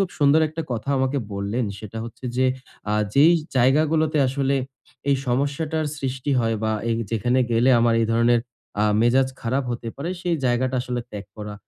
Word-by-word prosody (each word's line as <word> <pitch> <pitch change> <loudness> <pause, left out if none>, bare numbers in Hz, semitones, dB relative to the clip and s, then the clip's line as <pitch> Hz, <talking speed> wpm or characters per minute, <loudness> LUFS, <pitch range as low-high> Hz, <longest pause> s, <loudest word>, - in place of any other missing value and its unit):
খুব 195 - +1
সুন্দর 145 +1 +5
একটা 160 +1 -5
কথা 120 +3 -4
আমাকে 130 +2 0
বললেন। 100 +5 -2
সেটা 110 +1 -8
হচ্ছে 115 +2 -11
যে, 130 - +3 0.5
"আ - - +1 0.2
যেই 155 +5 +7 0.2
জায়গাগুলোতে 155 +4 +3
আসলে 135 +1 0 0.5
এই 140 - +4
সমস্যাটার 145 +5 -1
সৃষ্টি 135 +1 -3
হয় 115 -1 0
বা, 110 0 +1 0.2
এই 115 - +1 0.2
যেখানে 120 +3 +1
গেলে 120 +3 +3
আমার 115 0 +3
এই 115 - +2
ধরনের 115 +1 +3 0.4
আ - - +4 0.2
মেজাজ 130 +3 +3
খারাপ 130 +3 0
হতে 120 -1 -4
পারে, 160 +6 -4
সেই 175 -1 0
জায়গাটা 125 +1 +1
আসলে 125 -1 -3
ত্যাগ 105 -1 -7
করা।" 105 -1 -6
130 Hz, 175 wpm, -23 LUFS, 115-140 Hz, 0.5 s, যেই